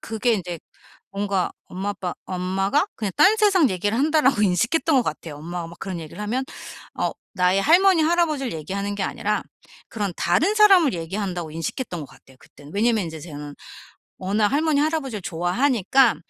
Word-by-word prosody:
그게 225 +1 0
인제 175 -4 -5 0.5
뭔가 195 -2 -1
엄마, 195 +3 -4
아빠 185 -3 -4
'엄마가 190 - 0
그냥 205 -4 -3
딴 425 +3 +6
세상 390 - +4
얘기를 205 +5 -1
한다.'라고 290 -6 +3
인식했던 230 - +2
것 255 - +4
같아요. 155 -4 -5
엄마가 170 +2 -5
막 170 - -13
그런 185 -3 -5
얘기를 160 +6 -8
하면 245 +6 -1 0.5
어 - - -1 0.2
나의 185 +1 +3
할머니, 355 +1 +5
할아버지를 310 -5 +1
얘기하는 195 +6 -4
게 200 - -2
아니라 - - -1 0.5
그런 205 -4 -3
다른 330 - +2
사람을 385 - +6
얘기한다고 175 0 -4
인식했던 165 - -4
것 145 - -7
같아요 130 0 -20
그때는. 150 -1 -16
왜냐하면 220 -2 +2
인제 160 -1 -7
저는 145 -2 -8 0.6
워낙 205 +3 +1
할머니, 300 0 +2
할아버지를 285 - -1
좋아하니까 230 - +2
205 Hz, 400 characters per minute, -23 LUFS, 175-280 Hz, 0.6 s, 딴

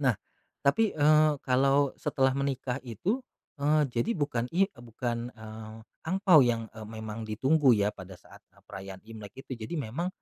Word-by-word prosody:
Nah 130 -5 +3 0.5
tapi, 210 +10 +3
eee, 155 0 +5
kalau 135 +2 +3
setelah 135 -1 +1
menikah 135 -2 -2
itu, 180 - -1 0.4
eee, 150 +2 +3
jadi 120 - -1
bukan 145 -7 -1
i 195 +2 +4
eee, 120 -3 -16
bukan, 120 +1 -4
eee, 110 0 -9 0.3
angpao 185 -2 +5
yang, 115 -2 0
eee, 110 -1 -9
memang 110 0 -6
ditunggu 135 +6 +3
ya 105 0 +2
pada 95 -2 -11
saat, - - -16 0.2
eee, - - -23
perayaan 95 0 -8
Imlek 105 -3 -9
itu. 130 - -7
Jadi 110 +10 -6
memang 140 +10 -3
125 Hz, 165 wpm, -29 LUFS, 110-145 Hz, 0.5 s, eee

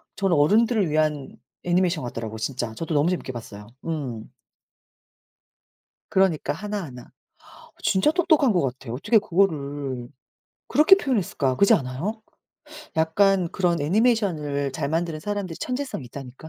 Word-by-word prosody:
저는 195 -4 +1
어른들을 210 +5 +3
위한 150 -2 0 0.3
애니메이션 175 -3 +1
같더라고 115 -2 -5
진짜. 120 -1 -3
저도 165 +6 -4
너무 145 +4 +3
재밌게 180 -7 -3
봤어요. 105 -4 -9 0.2
음. 135 -9 -4 1.8
그러니까 180 -7 +2
하나하나. 170 -9 -6 0.5
아 - - -17
진짜 190 +11 +3
똑똑한 315 -7 +3
것 180 - +2
같아. 130 -2 -4
어떻게 150 - +3
그거를 145 - -1 0.6
그렇게 310 +6 +6
표현했을까? 195 - 0
그렇지 200 - +5
않아요? 140 - -2 0.8
약간 180 +3 +3
그런 175 -3 0
애니메이션을 155 - +1
잘 140 - -3
만드는 165 0 -2
사람들이 200 -3 -4
천재성이 255 - -4
있다니까. 135 +4 -10
160 Hz, 340 characters per minute, -24 LUFS, 135-200 Hz, 1.8 s, 그렇게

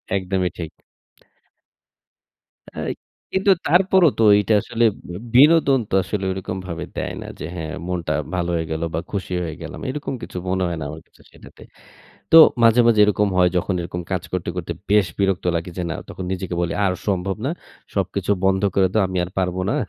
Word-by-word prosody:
একদমই 95 -1 0
ঠিক। 80 -3 -5 2.1
অ্যাই - - -3 0.4
কিন্তু 195 +1 +3 0.2
তারপরও 180 +1 +5
তো 115 - +4
এইটা 105 +2 +1
আসলে 115 - -1 0.3
বি 90 - -6 0.3
বিনোদন 145 -3 +5
তো - - -9
আসলে 95 +1 -3
ওইরকমভাবে 95 -2 -5
দেয় - - -3
না। - - -8
যে - - -5
হ্যাঁ, 80 -2 -5
মনটা 85 -4 -2 0.2
ভালো 85 -1 -1
হয়ে 80 -1 -1
গেল 80 0 -2
বা 80 - 0
খুশি 95 -3 -4
হয়ে 80 -3 -5
গেলাম। 80 - -7
এরকম 145 +1 -4
কিছু 90 - -8
মনে 95 0 0
হয় 85 -1 -3
না - - -4
আমার 80 +2 -8
কাছে - - -24
সেটাতে। - - -16 0.7
তো 165 - +9 0.3
মাঝে, 115 +1 +6
মাঝে 115 -3 +4
এরকম 105 0 +2
হয়, 90 -1 +5
যখন 90 +2 0
এরকম 90 +1 -5
কাজ 90 - -1
করতে, 90 -2 -3
করতে - - -3 0.2
বেশ 105 -2 +4
বিরক্ত 95 -2 0
লাগে 85 +2 -4
যে - - -1
না - - -2
তখন 95 - -7
নিজেকে 95 -1 -4
বলি 85 -1 -1
আর 95 - +2 0.2
সম্ভব 95 0 -1
না। - - 0 0.4
সবকিছু 100 0 -2
বন্ধ 95 +1 +2
করে 95 -1 +3
দাও। 110 - +4
আমি 95 0 -2
আর 90 - -9
পারব 90 -1 -1
না। - - 0
95 Hz, 185 wpm, -21 LUFS, 90-105 Hz, 2.1 s, তো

